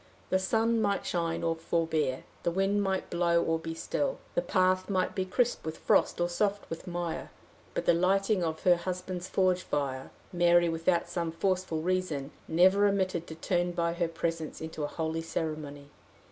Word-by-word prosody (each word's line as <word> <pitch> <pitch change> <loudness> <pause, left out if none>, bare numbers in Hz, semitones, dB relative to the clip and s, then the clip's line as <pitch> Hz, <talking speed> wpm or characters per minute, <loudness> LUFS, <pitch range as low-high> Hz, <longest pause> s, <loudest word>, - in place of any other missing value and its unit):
The 185 - +4
sun 225 +4 +2
might 200 -2 0
shine 170 -2 -1
or 165 0 +1
forbear, 160 -5 0 0.2
the - - +1
wind 195 +3 +1
might 190 -1 -1
blow 170 -1 +3
or 165 0 0
be 165 0 -5
still, - - -1 0.2
the - - +1
path 185 - +2
might 185 -2 +1
be 190 -3 -1
crisp 235 +6 0
with 160 0 -5
frost - - +2
or 175 - +2
soft 200 +3 -1
with 165 - -6
mire, 175 -1 -3 0.5
but - - -1
the - - +5
lighting 195 +3 +2
of 160 -1 -3
her 180 -2 +5
husband's 180 0 -4
forge 185 -1 +2
fire, 135 -5 -2 0.2
Mary, 175 0 +4
without 165 +2 +1
some 170 -2 -2
forceful 180 -2 -1
reason, 170 -6 -1 0.2
never 185 +5 +5
omitted 185 -4 0
to 160 - -7
turn 175 +2 0
by 170 -1 0
her 170 0 0
presence 165 -1 -3
into 160 -1 -5
a - - 0
holy 160 +1 -2
ceremony. 155 -3 -4
175 Hz, 175 wpm, -30 LUFS, 165-185 Hz, 0.5 s, the